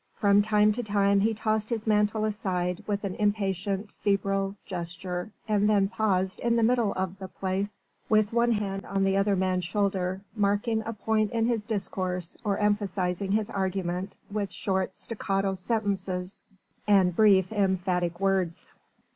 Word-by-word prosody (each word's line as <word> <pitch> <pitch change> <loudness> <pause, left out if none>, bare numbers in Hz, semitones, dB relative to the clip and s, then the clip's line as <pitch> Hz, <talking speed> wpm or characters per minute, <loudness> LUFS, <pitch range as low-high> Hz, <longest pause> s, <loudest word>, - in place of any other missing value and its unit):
From 200 0 +4
time 210 0 +4
to 235 +4 -2
time 200 -2 +2
he 220 +2 +2
tossed 215 0 -1
his 225 -3 -2
mantle 215 0 +2
aside 180 -4 -2
with 205 0 -1
an 195 -2 -2
impatient, 200 -1 -1
febrile 195 -1 0
gesture 180 +1 -4 0.2
and 210 -1 +2
then 200 -2 +3
paused 190 -3 0
in 235 0 +1
the 230 - +2
middle 235 -3 +3
of 190 +1 -3
the 190 - -6
Place, 190 +2 -3 0.3
with 215 0 +3
one 235 0 +3
hand 195 -2 -2
on 195 0 0
the 195 0 +2
other 195 0 +2
man's 185 -1 0
shoulder, 190 -1 -1
marking 210 +2 +1
a 230 - -2
point 215 0 0
in 225 0 0
his 230 -3 0
discourse 185 -5 -3
or 200 -2 0
emphasising 195 -2 0
his 215 -1 0
argument 190 -1 -2
with 200 -2 -2
short 190 -1 -1
staccato 195 -3 -2
sentences 190 -2 -2 0.5
and 190 -4 +4
brief, 195 -3 +5
emphatic 180 -4 0
words. 190 -3 0
200 Hz, 155 wpm, -27 LUFS, 190-210 Hz, 0.5 s, brief